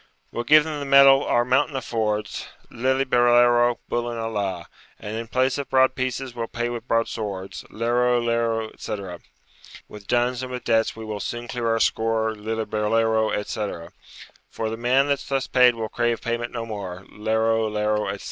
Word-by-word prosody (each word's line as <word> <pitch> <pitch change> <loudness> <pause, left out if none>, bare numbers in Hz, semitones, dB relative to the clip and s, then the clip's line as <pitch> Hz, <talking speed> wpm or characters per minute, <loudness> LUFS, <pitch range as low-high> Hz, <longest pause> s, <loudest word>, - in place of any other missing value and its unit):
'We'll 120 - -4
give 150 +4 +7
them 155 -1 -4
the 140 - -4
metal 140 0 +7
our 120 0 +2
mountain 135 +3 +1
affords, 110 -5 -2 0.2
Lillibulero, 120 -2 +3
bullen 120 0 -2
a 115 0 -3
la, 95 -5 -3 0.3
And 105 +1 -6
in 115 +1 -5
place 130 +3 +1
of 140 - -5
broad 130 0 +4
pieces, 130 0 -3
we'll 115 -1 -4
pay 120 +1 -3
with 120 0 -6
broadswords, 105 -5 -2
Lero, 120 +2 +1
lero, 115 -1 -1
etc. 95 -5 -6 0.7
With 105 -2 -12
duns 120 +1 +1
and 130 0 -6
with 125 0 -5
debts 115 0 +1
we 110 0 -8
will 105 -1 -5
soon 120 +3 -5
clear 120 -1 -3
our 115 0 +1
score, 110 0 +1
Lillibulero, 110 +1 0
etc. 105 -5 -4 0.6
For 110 -1 -4
the - - -3
man 125 +4 +2
that's 140 -1 -2
thus 135 -1 0
paid 125 -2 +4
will 110 -1 -3
crave 120 0 -1
payment 120 0 -3
no 115 -1 -4
more, 95 -4 -7
Lero, 110 +1 0
lero, 105 0 0
etc. - - -4
115 Hz, 170 wpm, -23 LUFS, 110-125 Hz, 0.7 s, give